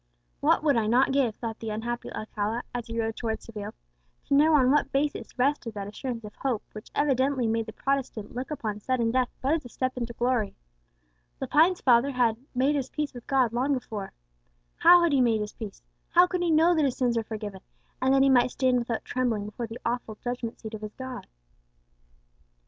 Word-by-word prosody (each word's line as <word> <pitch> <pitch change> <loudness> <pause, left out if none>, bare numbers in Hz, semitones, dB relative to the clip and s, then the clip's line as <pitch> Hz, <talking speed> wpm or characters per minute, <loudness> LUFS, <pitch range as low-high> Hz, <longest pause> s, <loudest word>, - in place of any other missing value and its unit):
"What - - +3
would 290 -3 +3
not 230 +4 +3
I - - 0
give," 265 -5 +1
thought 225 -2 -5
the 225 - -5
unhappy 235 +3 -4
Alcala, 215 +2 -3
as 245 -2 -4
he 230 0 -4
rode 225 -1 -1
towards 220 -2 -3
Seville, 210 -3 -7 0.5
"to - - -1
know 305 +3 +5
on 260 -3 +5
what 295 - +2
basis 285 0 -2
rested 250 -4 0
that 200 -1 -4
assurance 230 +2 -5
of 210 -1 -9
hope 255 -6 -1
which 215 - -10
evidently 270 -2 +2
made 225 0 0
the - - -5
Protestant 270 -6 -2
look 250 +2 -4
upon 220 -8 -3
sudden 235 0 0
death 255 0 +1
but 275 +4 +2
as 325 - 0
a 245 - -10
step 255 +2 -2
into 235 -1 -3
glory! 240 -4 0 0.8
Lepine's 345 +4 +3
father 245 +1 +4
had 245 -4 +2 0.2
'made 265 +4 +3
his 275 -3 -2
peace 300 -1 -3
with 245 -2 -11
God 260 -5 +2
long 260 +4 +1
before!' 215 -6 -5 0.7
How 350 0 +7
had 340 - +3
he 275 -2 +4
made 225 -3 +3
his 210 - -5
peace; 215 -4 -8 0.3
how 350 +1 +6
could 360 0 -2
he 350 - +1
know 325 +2 +5
that 315 -3 +2
his 265 - -1
sins 245 -2 +1
were 230 - +2
forgiven, 210 -3 -6 0.4
and 260 +1 +3
that 270 0 +5
he 275 - +5
might 250 -1 +5
stand 255 -1 +2
without 235 -1 -3
trembling 240 -5 -1
before 220 +3 -5
the 225 +1 -7
awful 235 -2 -2
judgment 245 0 -5
seat 220 -1 -8
of 215 - -6
his 215 0 -7
God?" 260 -1 -7
245 Hz, 210 wpm, -27 LUFS, 225-270 Hz, 0.8 s, How